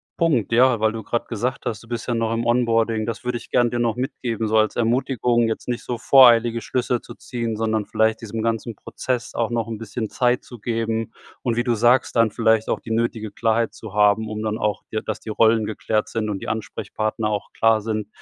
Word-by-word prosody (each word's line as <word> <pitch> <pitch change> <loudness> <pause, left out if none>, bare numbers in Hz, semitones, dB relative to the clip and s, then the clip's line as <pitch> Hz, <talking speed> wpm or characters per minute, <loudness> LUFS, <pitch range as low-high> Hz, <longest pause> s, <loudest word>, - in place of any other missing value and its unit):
Punkt, 145 - +1
ja? 120 0 +4
Weil 110 0 +2
du 115 0 -5
grade 120 +2 -2
gesagt 125 +4 -3
hast, 110 -2 -3
du 115 - -16
bist 120 0 -5
ja 120 - 0
noch 115 -1 0
im 115 +1 -1
Onboarding, 115 -2 +1
das 115 +1 -4
würde 125 -1 -2
ich - - -15
gern 120 -1 +2
dir 120 - -1
noch 115 -2 +1
mitgeben, 120 -4 -3
so 110 +1 +2
als 110 - +1
Ermutigung. 120 0 +1
Jetzt 110 - -4
nicht 120 -1 -3
so 120 - -3
voreilige 120 -2 +6
Schlüsse 125 +1 -1
zu - - -11
ziehen, 115 -3 -4
sondern 110 -2 -1
vielleicht 110 0 +1
diesem 110 0 -4
ganzen 115 0 -2
Prozess 125 +3 -4
auch 115 -1 0
noch 115 -2 -1
'n 115 -2 -5
bisschen 110 0 -4
Zeit 125 0 +1
zu 120 -3 -12
geben. 115 0 -2 0.3
Und 120 -2 -1
wie 120 - +1
du 120 -1 +1
sagst, 120 +3 +3
dann 115 -1 +4
vielleicht 110 0 +2
auch - - 0
die 115 - -9
nötige 110 -2 -1
Klarheit 115 +1 0
zu 110 -4 -10
haben, 105 +1 +3
um 110 0 -4
dann 110 0 -2
auch 105 -2 -1
dir 110 - -1
dass 110 - -4
die - - -9
Rollen 110 0 +3
geklärt 110 0 -1
sind 110 -2 -2
und 100 -2 -3
die - - -8
Ansprechpartner 110 0 -3
auch 105 - -3
klar 110 -1 +3
sind, 110 -1 -3
115 Hz, 225 wpm, -22 LUFS, 110-120 Hz, 0.3 s, voreilige